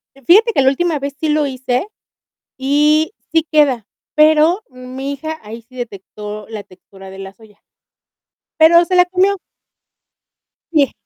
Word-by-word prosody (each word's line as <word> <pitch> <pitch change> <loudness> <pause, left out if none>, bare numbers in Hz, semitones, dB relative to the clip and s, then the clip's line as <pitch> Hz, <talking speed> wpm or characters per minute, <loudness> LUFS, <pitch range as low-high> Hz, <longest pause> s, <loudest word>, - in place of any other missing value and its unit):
Eh, 275 - -19
fíjate 440 - +5
que - - +2
la 265 - +4
última 310 +2 -1
vez 280 0 -5
sí 315 - -1
lo 300 0 +1
hice 260 +3 -2 0.7
y 300 +6 +2 0.2
sí 325 -1 +2
queda, 280 -8 +2 0.3
pero, 310 +4 +4
mi 255 +2 -7
hija 315 +3 -6
ahí 220 +2 -9
sí 240 +3 -22
detectó 210 -2 -8
la 215 -2 -7
textura 190 +1 -16
de 190 0 -11
la 195 0 -9
soya. 210 -1 -21 1.0
Pero, 340 +2 +6
se 370 - -1
la 360 0 +6
comió. 375 +2 +1 1.4
Sí. 285 -5 +3
280 Hz, 150 wpm, -17 LUFS, 230-315 Hz, 1.4 s, Pero